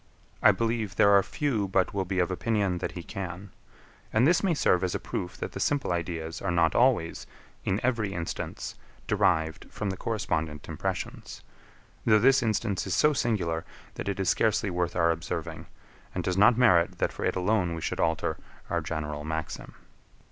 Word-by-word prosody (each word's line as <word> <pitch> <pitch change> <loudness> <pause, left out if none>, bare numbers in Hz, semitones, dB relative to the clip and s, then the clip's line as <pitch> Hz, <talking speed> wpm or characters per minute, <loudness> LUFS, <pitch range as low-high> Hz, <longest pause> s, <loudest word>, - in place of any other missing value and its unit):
I - - +8
believe 110 -2 -1
there 100 0 +5
are 100 - +7
few 115 -3 -1
but 95 -1 +1
will 95 -2 -1
be 95 +1 -3
of 90 0 +2
opinion 100 -2 0
that - - -3
he 90 - -7
can: 95 +1 -6 0.6
and 110 +3 +4
this 175 +4 +4
may 185 -4 +1
serve 90 -10 +2
as 90 - -1
a - - -1
proof 90 - -5
that - - -5
the - - -6
simple 145 -9 0
ideas 85 -1 -4
are 95 - -2
not 85 -2 +3
always, 120 -10 +2 0.4
in 95 - +1
every 115 -5 0
instance, 85 -3 -4 0.3
derived 80 -1 +1
from 105 -2 -3
the 95 - -5
correspondent 80 -10 -2
impressions; - - -5 0.6
though 110 -1 +5
this 135 +5 +5
instance 110 -4 -1
is 95 - 0
so 150 0 +4
singular, 90 - 0 0.3
that 100 - -4
it 100 - -3
is 95 - 0
scarcely 110 -2 +2
worth 90 -1 -1
our 85 -1 +3
observing, 80 -1 -4 0.5
and - - -1
does 90 - 0
not 110 +5 +5
merit 90 -9 +4
that - - 0
for - - -6
it - - +1
alone 90 -2 +1
we 80 - -6
should - - -3
alter 80 -1 0 0.3
our - - +1
general 75 -2 -4
maxim. 80 +1 -5
95 Hz, 185 wpm, -28 LUFS, 85-110 Hz, 0.6 s, I